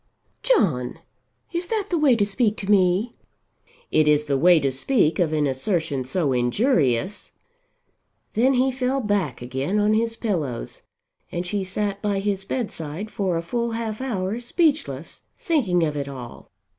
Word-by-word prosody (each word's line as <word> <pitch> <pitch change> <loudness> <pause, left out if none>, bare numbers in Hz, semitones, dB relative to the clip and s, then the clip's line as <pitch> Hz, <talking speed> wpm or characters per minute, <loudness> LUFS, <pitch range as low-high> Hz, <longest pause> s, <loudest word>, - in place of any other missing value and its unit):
"John, 155 - +1 0.6
is 345 +1 -2
that 420 -2 -2
the 345 - +2
way 280 -5 +5
to 205 -3 +2
speak 210 +1 0
to 200 0 -2
me?" 195 +4 +3 0.8
"It 155 -1 +3
is 150 0 +4
the 140 -2 0
way 170 +4 +5
to 135 -2 0
speak 155 - +1
of 170 -4 +2
an 150 -1 +1
assertion 140 -1 -1
so 140 0 0
injurious." 130 - +1 1.0
Then 255 +5 +3
he 260 +2 +3
fell 260 +1 -1
back 195 - -1
again 135 +10 -2
on 210 +1 +3
his 230 +1 0
pillows 150 - -3 0.5
and 175 +1 -3
she 200 +2 -1
sat 200 +1 -2
by 205 -2 0
his 195 -1 -1
bedside 200 - -4
for 185 -4 -1
a 165 - -3
full 235 +5 -2
half 225 0 -3
hour 215 -4 -2
speechless, 240 - -1 0.2
thinking 210 - +1
of 150 -2 0
it 140 -1 -3
all. 130 -4 -9
195 Hz, 155 wpm, -23 LUFS, 150-230 Hz, 1.0 s, way